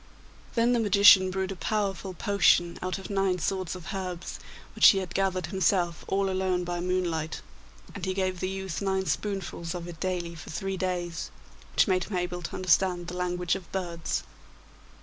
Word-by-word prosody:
Then 235 Hz, +1 st, +3 dB
the 240 Hz, -, +2 dB
magician 200 Hz, -3 st, +7 dB
brewed 190 Hz, +1 st, -2 dB
a -, -, -4 dB
powerful 195 Hz, -1 st, -2 dB
potion 175 Hz, -4 st, +3 dB
out 185 Hz, 0 st, -2 dB
of 195 Hz, +1 st, -8 dB
nine 195 Hz, -2 st, +1 dB
sorts 185 Hz, +1 st, -2 dB
of 180 Hz, +2 st, -7 dB
herbs 185 Hz, -2 st, -5 dB, 0.3 s
which -, -, +7 dB
he 195 Hz, -, +7 dB
had 185 Hz, -2 st, -3 dB
gathered 185 Hz, -2 st, 0 dB
himself 175 Hz, -1 st, +1 dB
all 195 Hz, 0 st, +1 dB
alone 185 Hz, -1 st, 0 dB
by 175 Hz, 0 st, -3 dB
moonlight, 175 Hz, -3 st, -1 dB, 0.5 s
and 195 Hz, -, -8 dB
he 185 Hz, 0 st, -1 dB
gave 185 Hz, -1 st, -1 dB
the 185 Hz, -, -1 dB
youth 190 Hz, -2 st, -4 dB
nine 190 Hz, -1 st, 0 dB
spoonfuls 190 Hz, -4 st, -3 dB
of 175 Hz, -1 st, -5 dB
it 170 Hz, -2 st, -9 dB
daily 180 Hz, -2 st, -2 dB
for 160 Hz, -, -10 dB
three 195 Hz, +4 st, -3 dB
days, 175 Hz, -2 st, -3 dB, 0.5 s
which -, -, +5 dB
made 185 Hz, -2 st, +2 dB
him 195 Hz, -, -3 dB
able 180 Hz, 0 st, -2 dB
to 170 Hz, -, -5 dB
understand 180 Hz, -1 st, +2 dB
the 180 Hz, -, -6 dB
language 180 Hz, -1 st, -1 dB
of 190 Hz, -3 st, -5 dB
birds. 170 Hz, -4 st, -2 dB
185 Hz, 180 wpm, -28 LUFS, 175-195 Hz, 0.5 s, magician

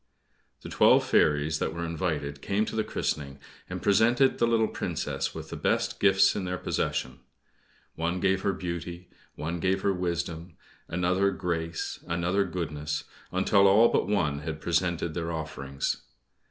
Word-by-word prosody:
The -, -, -7 dB
twelve -, -, +5 dB
fairies 75 Hz, +1 st, +2 dB
that 80 Hz, -, -2 dB
were 85 Hz, 0 st, -3 dB
invited 80 Hz, -4 st, -3 dB
came 105 Hz, +2 st, 0 dB
to -, -, -5 dB
the 110 Hz, -, +1 dB
christening, 70 Hz, -7 st, -3 dB, 0.3 s
and -, -, -5 dB
presented 120 Hz, +6 st, +4 dB
the 120 Hz, -, +3 dB
little 115 Hz, -1 st, +3 dB
Princess -, -, -3 dB
with -, -, -8 dB
the -, -, -4 dB
best -, -, 0 dB
gifts 95 Hz, -1 st, +5 dB
in 100 Hz, -, -2 dB
their 90 Hz, 0 st, -2 dB
possession. -, -, -2 dB, 0.7 s
One 85 Hz, +3 st, -2 dB
gave 95 Hz, 0 st, +2 dB
her 100 Hz, -, +1 dB
beauty, 85 Hz, -1 st, -6 dB, 0.2 s
one 85 Hz, +2 st, -3 dB
gave 95 Hz, +3 st, 0 dB
her 100 Hz, -, +2 dB
wisdom, 85 Hz, -2 st, -3 dB, 0.3 s
another 90 Hz, +3 st, +1 dB
grace, 85 Hz, -3 st, -3 dB
another 90 Hz, +4 st, +1 dB
goodness, 75 Hz, -5 st, -3 dB, 0.3 s
until 100 Hz, +2 st, +4 dB
all 110 Hz, +4 st, +6 dB
but -, -, +1 dB
one 80 Hz, -9 st, +1 dB
had 75 Hz, +1 st, -5 dB
presented 85 Hz, 0 st, 0 dB
their 85 Hz, 0 st, -3 dB
offerings. 75 Hz, -4 st, -3 dB
85 Hz, 155 wpm, -28 LUFS, 80-95 Hz, 0.7 s, all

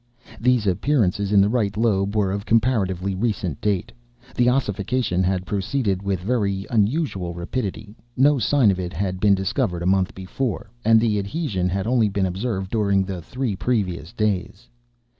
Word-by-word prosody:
These 125 Hz, -2 st, +2 dB
appearances 100 Hz, -1 st, +1 dB
in 100 Hz, -1 st, +6 dB
the 100 Hz, -, +4 dB
right 105 Hz, -4 st, 0 dB
lobe 100 Hz, -3 st, +1 dB
were 100 Hz, -3 st, +1 dB
of 100 Hz, +1 st, -3 dB
comparatively 100 Hz, -5 st, +1 dB
recent 95 Hz, -, -2 dB
date. 100 Hz, -4 st, -1 dB, 0.4 s
The 120 Hz, -1 st, +3 dB
ossification 120 Hz, -4 st, 0 dB
had 95 Hz, 0 st, 0 dB
proceeded 100 Hz, 0 st, -1 dB
with 100 Hz, -2 st, -1 dB
very 100 Hz, -2 st, -1 dB
unusual 105 Hz, -, 0 dB
rapidity; 100 Hz, +3 st, -4 dB, 0.2 s
no 140 Hz, +2 st, +4 dB
sign 120 Hz, -1 st, +3 dB
of 95 Hz, -, -2 dB
it 90 Hz, -1 st, -4 dB
had 95 Hz, +1 st, -2 dB
been 100 Hz, 0 st, +4 dB
discovered 90 Hz, -2 st, -1 dB
a -, -, -3 dB
month 95 Hz, 0 st, +1 dB
before, 105 Hz, +3 st, -4 dB
and 115 Hz, +1 st, +5 dB
the 110 Hz, -2 st, +1 dB
adhesion 100 Hz, -, -2 dB
had 95 Hz, +2 st, -2 dB
only 115 Hz, -2 st, +2 dB
been 100 Hz, -1 st, 0 dB
observed 95 Hz, +1 st, -3 dB
during 100 Hz, -3 st, +2 dB
the 95 Hz, -2 st, -5 dB
three 125 Hz, +3 st, -3 dB
previous 95 Hz, -7 st, -2 dB
days. 105 Hz, +1 st, -2 dB
100 Hz, 160 wpm, -22 LUFS, 95-115 Hz, 0.4 s, in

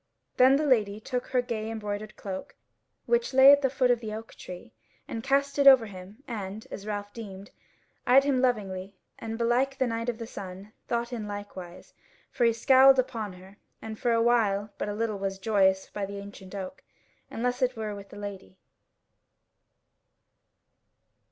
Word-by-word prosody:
Then 260 Hz, +2 st, +7 dB
the 300 Hz, +2 st, +1 dB
Lady 215 Hz, -7 st, +2 dB
took 245 Hz, +3 st, -4 dB
her 250 Hz, -1 st, +1 dB
gay 220 Hz, -2 st, -4 dB
embroidered 210 Hz, -1 st, -5 dB
cloak, 190 Hz, -2 st, -7 dB, 0.5 s
which 475 Hz, -, +1 dB
lay 265 Hz, +1 st, +10 dB
at 285 Hz, 0 st, +6 dB
the 265 Hz, -, +2 dB
foot 255 Hz, -1 st, +2 dB
of 240 Hz, -, +2 dB
the 215 Hz, -2 st, -5 dB
oak 225 Hz, +1 st, -9 dB
tree, 180 Hz, -10 st, -10 dB, 0.3 s
and 225 Hz, -, -4 dB
cast 280 Hz, +1 st, +1 dB
it 280 Hz, -, +5 dB
over 260 Hz, -4 st, +9 dB
him 200 Hz, +4 st, -11 dB
and, 210 Hz, -2 st, -6 dB
as 200 Hz, -, -7 dB
Ralph 205 Hz, -1 st, -4 dB
deemed, 200 Hz, -4 st, -9 dB, 0.6 s
eyed 260 Hz, +3 st, +7 dB
him 275 Hz, -3 st, +1 dB
lovingly, 200 Hz, -6 st, -1 dB, 0.2 s
and 225 Hz, 0 st, -5 dB
belike 245 Hz, +4 st, +1 dB
the 260 Hz, -, +2 dB
Knight 230 Hz, 0 st, -2 dB
of 235 Hz, -, -3 dB
the 230 Hz, -, -6 dB
Sun 195 Hz, -1 st, -9 dB
thought 235 Hz, +1 st, -2 dB
in 220 Hz, -3 st, -4 dB
likewise, 200 Hz, -4 st, -8 dB, 0.4 s
for 240 Hz, -, +1 dB
he 230 Hz, -, +5 dB
scowled 265 Hz, +3 st, +6 dB
upon 230 Hz, -6 st, -1 dB
her; 190 Hz, +2 st, -15 dB, 0.2 s
and 220 Hz, -1 st, -8 dB
for 240 Hz, -, +1 dB
awhile 225 Hz, -3 st, +2 dB
but -, -, -2 dB
little 215 Hz, 0 st, -2 dB
was 195 Hz, 0 st, -3 dB
the 190 Hz, -, -26 dB
joyance 190 Hz, -3 st, +3 dB
by 200 Hz, -2 st, -3 dB
the 200 Hz, 0 st, -7 dB
ancient 200 Hz, -1 st, -10 dB
oak, 195 Hz, +7 st, -7 dB, 0.5 s
unless 245 Hz, +2 st, -2 dB
it 255 Hz, -1 st, +1 dB
were 215 Hz, -1 st, -3 dB
with 200 Hz, -1 st, -10 dB
the 205 Hz, -, -11 dB
Lady. 195 Hz, -, -8 dB
220 Hz, 175 wpm, -28 LUFS, 200-250 Hz, 0.6 s, lay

